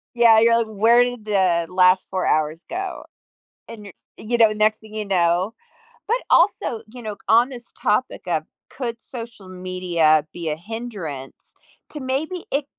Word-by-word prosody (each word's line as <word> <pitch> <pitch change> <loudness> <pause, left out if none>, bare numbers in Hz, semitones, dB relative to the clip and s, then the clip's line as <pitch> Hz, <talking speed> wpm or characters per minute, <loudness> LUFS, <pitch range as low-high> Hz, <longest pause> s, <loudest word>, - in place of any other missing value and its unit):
Yeah, 230 -2 +6
you're 230 +1 +5
like, 230 -1 0
"Where 225 +3 +4
did 245 -3 -5
the 185 -5 +1
last 185 0 +4
4 185 -1 -2
hours 155 +2 0
go?" 370 +2 -5 0.7
And 215 -3 -10
you 195 - -11 0.2
you 235 +2 -2
know, 220 -2 +5
next 215 0 +2
thing 215 -1 -15
you 215 - -3
know 180 +1 +1 0.5
but 470 +3 +2
also, 335 - +3
you 240 +1 -11
know, 215 -1 -4
c - - -17
on 235 +4 +5
this 240 -2 -11
topic - - 0
of - - 0 0.3
"Could 235 -3 -5
social 230 -5 -10
media 180 -4 +1
be 170 -2 -4
a 150 - -1
hindrance?" 180 - -7 0.4
To 300 - -7
maybe 295 +7 -3
it 280 0 0
215 Hz, 170 wpm, -22 LUFS, 180-240 Hz, 0.7 s, Yeah